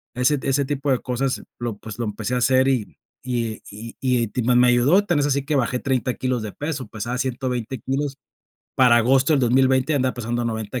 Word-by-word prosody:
ese 125 +4 +2
t 135 - -3
ese 140 +1 +1
tipo 140 0 -1
de 130 - +2
cosas 130 +1 -2 0.2
lo, 120 -3 -4
pues, 110 0 -9
lo 120 - -1
empecé 105 +3 -4
a - - +1
hacer 130 +1 +3
y 125 -6 -1 0.3
y 120 -3 -3
y 110 +3 -9
y 125 -3 +1
ti 125 +4 -3
ma 125 +2 +3
me 125 0 +5
ayudó, 135 +12 +4
tan 175 -6 +1
es 145 - +2
así 140 -1 0
que 150 +1 -1
bajé 125 -1 0
30 130 -2 -1
kilos 130 -2 -1
de 110 -1 -5
peso, 145 -2 -5
pesaba 110 +4 -4
120 125 -1 -3
kilos, 135 +3 -3 0.6
para 125 -3 +6
agosto 130 +5 +3
del 145 - +3
2020 130 +3 +3
andaba 130 -2 0
pesando 120 0 -3
90 110 +1 -3
125 Hz, 215 wpm, -22 LUFS, 120-135 Hz, 0.6 s, para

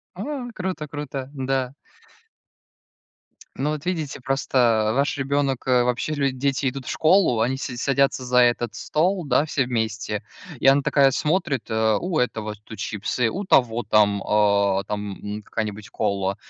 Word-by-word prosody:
А! 250 +6 -4
Круто! 185 -6 -4
Круто! 140 -2 -6
Да. 135 -2 -2 1.8
Ну, 140 +3 -1
вот 150 0 -4
видите, 160 -7 -3
просто 120 -5 +1
ваш 140 +2 +1
ребенок, 135 -1 -1
э 125 -1 +4
вообще 125 +5 -1
люди 140 -2 0
дети 135 0 0
идут 130 -1 -8
в - - -3
школу, 160 - +3
они 130 +4 +1
си 130 -2 -5
садятся 135 0 +1
за 125 0 +3
этот 120 -2 +2
стол, 180 +3 0
да, 140 +2 +2
все 140 -4 0
вместе, 110 -3 -2 0.4
и - - -4
она 135 +1 +6
такая 140 -1 +4
смотрит: 150 - -1
"Э, 110 -1 +2
у 175 -2 -2
этого 110 -4 -1
тут 110 -1 -11
чипсы, 110 +3 -1
у 195 - -4
того 120 -8 +3
там, 105 -2 +3
а, 100 -2 +2
там, 105 -1 -5 0.2
м, 105 - -6
какая-нибудь 105 -1 -5
кола". 100 -1 -1
130 Hz, 155 wpm, -23 LUFS, 110-145 Hz, 1.8 s, она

